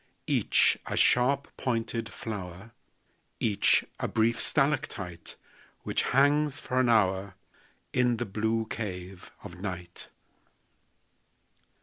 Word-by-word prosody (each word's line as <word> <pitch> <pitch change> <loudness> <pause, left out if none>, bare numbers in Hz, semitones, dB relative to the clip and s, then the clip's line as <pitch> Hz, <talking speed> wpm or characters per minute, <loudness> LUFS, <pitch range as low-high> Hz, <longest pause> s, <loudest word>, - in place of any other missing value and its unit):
Each - - +3
a - - -3
sharp 135 +3 +3
pointed 115 -2 -2
flower, 100 -1 -7 0.7
Each 105 -3 +3
a - - -1
brief 115 +1 +2
stalactite 95 - 0 0.5
Which - - 0
hangs 145 +2 +2
for 130 -4 -1
an 125 -2 +3
hour 95 -3 +2 0.6
In 125 -1 +2
the 120 - -2
blue 110 +3 -1
cave 95 -4 -6
of 90 - -10
night. 90 -3 -5
110 Hz, 100 wpm, -28 LUFS, 95-125 Hz, 0.7 s, Each